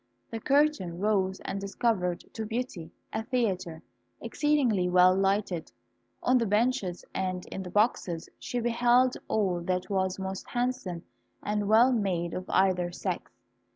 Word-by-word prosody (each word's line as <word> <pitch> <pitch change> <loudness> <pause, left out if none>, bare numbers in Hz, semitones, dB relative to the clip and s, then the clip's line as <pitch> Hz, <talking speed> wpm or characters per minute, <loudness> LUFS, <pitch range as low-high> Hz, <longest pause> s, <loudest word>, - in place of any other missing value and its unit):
The 225 - -4
curtain 275 - +2
rose 190 -1 +1
and 195 - -4
discovered 195 -3 0
to 225 - -4
Beauty 220 -7 -4 0.2
a 220 - -1
theatre, 195 -9 -2 0.4
exceedingly 255 -12 +1
well 180 +1 +6
lighted. 195 -3 0 0.5
On 255 0 +4
the 230 - 0
benches 210 -3 0
and 185 -1 -2
in 190 - -4
the 180 - -7
boxes 185 -5 0
she 245 - -3
beheld 240 +2 +3
all 190 -5 +1
that 180 +2 -2
was 190 -1 0
most 190 0 -5
handsome 240 -9 -2 0.4
and 210 -1 -1
well 230 +5 +6
made 185 -7 0
of 185 - -5
either 180 -2 +2
sex. - - -4
195 Hz, 140 wpm, -28 LUFS, 180-235 Hz, 0.5 s, well